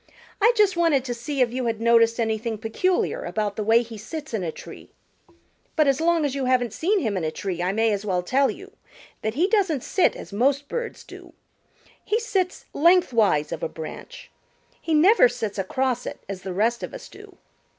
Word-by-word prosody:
"I 450 +4 +6
just 415 -4 +3
wanted 325 -6 +2
to 245 - -2
see 270 +4 -3
if 240 -1 +2
you 255 -1 -2
had 225 -1 -2
noticed 230 0 +3
anything 225 0 -1
peculiar 235 - -1
about 210 -2 -2
the 215 - -2
way 225 +3 +4
he 225 -2 -10
sits 295 +6 -7
in 220 - -1
a 165 - -2
tree. - - -12 0.9
But 310 -3 +3
as 275 +2 +2
long 335 -2 +2
as 280 - -1
you 275 -2 -2
haven't 250 -3 +1
seen 380 - +1
him 215 -7 -1
in 180 - -2
a 155 - 0
tree 175 +1 -4
I 180 +1 0
may 225 +2 +1
as 200 -1 -2
well 185 -3 -1
tell 270 +8 +2
you 390 +1 -8 0.5
that 220 +1 -3
he 340 +6 +2
doesn't 380 - +1
sit 375 - +2
as - - -10
most 275 +6 +1
birds 475 +5 -5
do. - - -13 0.7
He 440 - 0
sits 390 -6 -2
lengthwise 245 - +3
of - - -4
a - - -2
branch. 160 -1 -9 0.5
He 320 - 0
never 335 - +6
sits 225 -5 -4
across 250 +5 -1
it - - -7
as 195 -1 -6
the 190 - -6
rest 225 +6 0
of - - -6
us - - -9
do." - - -15
245 Hz, 205 wpm, -24 LUFS, 215-320 Hz, 0.9 s, I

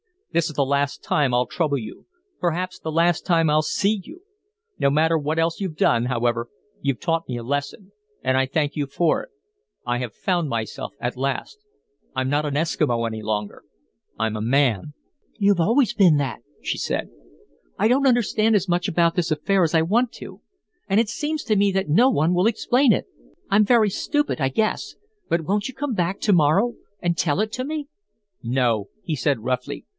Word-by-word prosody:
This 170 0 +1
is - - -7
the 140 - +2
last 140 +1 -1
time 140 -4 +1
I'll 125 +1 +3
trouble 150 -2 -1
you. 110 -4 -9 0.3
Perhaps 180 +2 -2
the 160 - -5
last 165 +1 +2
time 165 -3 +3
I'll 155 +1 +4
see 200 +6 0
you. 320 - -13 0.6
No 140 - +3
matter 160 +3 +3
what 155 +1 -2
else 165 0 0
you've 190 -6 -3
done, 120 -5 +2
however, 120 -1 0 0.3
you've 140 -3 -1
taught 165 -1 -1
me 125 - -3
a 120 - -6
lesson, 145 - -4 0.3
and 130 - +2
I 135 - +3
thank 150 +2 -1
you 145 -2 -1
for 160 +4 +1
it. - - -14 0.6
I 120 0 0
have 120 -3 -5
found 175 -4 0
myself 115 - -4
at - - -3
last. 135 - -3 0.6
I'm 130 0 0
not 145 +2 +1
an 145 -1 -2
Eskimo 145 -6 0
any 110 -1 -4
longer 105 -1 -3 0.5
I'm 110 -1 -1
a - - -4
man!" 125 +1 +1 0.4
"You've 200 -3 +3
always 235 +7 +3
been 190 -8 +5
that," 135 -5 -2 0.2
she - - -2
said. - - -2 0.7
"I 220 - +2
don't 270 +3 +3
understand 225 -3 +2
as 195 -2 +1
much 175 +2 +1
about 170 -2 +2
this 170 -2 0
affair 185 +5 +2
as 165 0 +1
I 160 - +5
want 225 +9 +1
to, - - -10 0.5
and 195 - +1
it 225 -2 +1
seems 305 +3 -3
to 215 -3 +1
me 200 0 +3
that 190 -3 -1
no 235 - +5
one 170 - +2
will 180 +4 +3
explain 245 +2 +3
it. - - -1 0.4
I'm 210 +2 +4
very 225 -2 +4
stupid, 295 - -1
I 135 - +2
guess; 215 +12 -1 0.3
but 170 - +1
won't 200 +6 -1
you 260 - -7
come 275 -1 -2
back 185 0 -1
to 210 - +3
morrow 180 +9 +3 0.3
and 170 -1 0
tell 175 0 +1
it 215 0 -2
to 255 +3 -3
me?" 300 -1 -4 0.5
"No," 115 -4 0 0.2
he 160 - -2
said, 130 -1 0
roughly. 125 +3 -3
165 Hz, 195 wpm, -23 LUFS, 135-200 Hz, 0.7 s, been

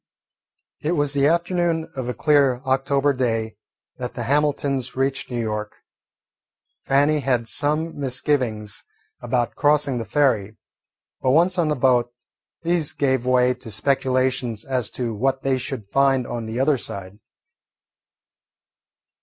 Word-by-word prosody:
It 155 +3 0
was 145 -3 +1
the 140 0 +3
afternoon 170 0 0
of 130 -2 -4
a 125 - -3
clear 140 0 +3
October 135 +2 +2
day 115 -4 -1 0.4
that 125 -1 -6
the 120 - -3
Hamiltons 140 -1 0
reached 135 0 -1
New 120 -2 -3
York. 105 -2 -3 1.1
Fannie 145 +3 +3
had 125 -4 0
some 150 +5 -1
misgivings 125 - -1 0.4
about 120 -1 -1
crossing 145 -4 +2
the 115 - -4
ferry, 110 -5 +1 0.6
but 130 - +1
once 175 +6 +3
on 165 - +2
the 150 - +1
boat 125 -2 +2 0.5
these 170 -3 +1
gave 130 -3 0
way 125 0 +4
to 125 - -10
speculations 130 0 0
as 130 -4 -1
to 120 -3 -3
what 130 +5 -1
they 135 -1 +1
should 125 -5 -5
find 135 -1 +3
on 115 -2 -5
the 110 +2 -4
other 140 +1 +3
side. 100 -2 -7
130 Hz, 135 wpm, -22 LUFS, 120-145 Hz, 1.1 s, way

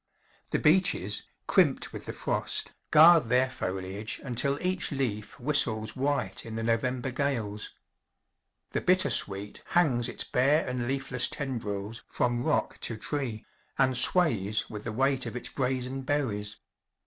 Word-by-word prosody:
The - - 0
beeches, 150 - +2 0.2
crimped - - +2
with - - -8
the - - -3
frost, - - -1 0.2
guard 160 -1 +7
their 125 +2 +2
foliage 95 +1 -3
until 140 +2 0
each 185 -1 +1
leaf 120 -5 -3
whistles 120 -6 +2
white 140 +2 -1
in 110 -1 -7
the 115 - -3
November 125 +3 0
gales. 115 -6 -2 1.0
The - - -1
bittersweet 110 - +1
hangs 130 -9 +1
its - - -2
bare 140 +5 +2
and 125 -1 -2
leafless 135 -2 +1
tendrils 110 -5 -4
from 120 -1 0
rock 155 - 0
to 115 - -3
tree, 120 -4 -4 0.3
and 130 -1 +3
sways 115 - +3
with 105 -1 -7
the 120 - -3
weight 135 +3 +1
of - - -6
its 125 - -4
brazen 130 0 -2
berries. 110 -8 -2
125 Hz, 135 wpm, -28 LUFS, 110-140 Hz, 1.0 s, guard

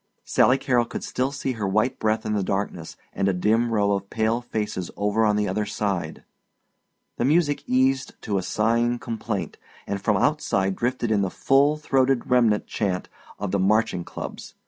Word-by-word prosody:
Sally 130 - +3
Carrol 125 -3 +1
could - - -6
still 130 +2 -1
see 135 -1 -3
her 110 -5 -3
white 110 +7 +1
breath 110 0 0
in 110 - -1
the 105 - +1
darkness, 95 -3 -3 0.2
and 95 - 0
a - - +1
dim 110 +6 +1
row 105 -2 +2
of 100 0 -2
pale 115 +2 0
faces 105 -6 -3
over 105 +2 +1
on 105 -1 +3
the 105 0 +1
other 105 +2 -1
side. 95 -7 -3 0.9
The 120 - 0
music 145 0 +2
eased 130 +1 +1
to 100 -3 0
a - - -2
sighing 115 +5 +1
complaint, 115 -4 -4 0.3
and 100 -1 -3
from 105 0 +2
outside 95 -8 +1
drifted 120 0 -1
in 105 -2 +3
the 95 - 0
full 140 +8 +3
throated 135 -4 +1
remnant 115 -4 +3
chant 95 -4 -2 0.3
of 100 -2 -3
the 100 - +1
marching 100 -2 +2
clubs. - - -8
110 Hz, 180 wpm, -24 LUFS, 100-125 Hz, 0.9 s, Sally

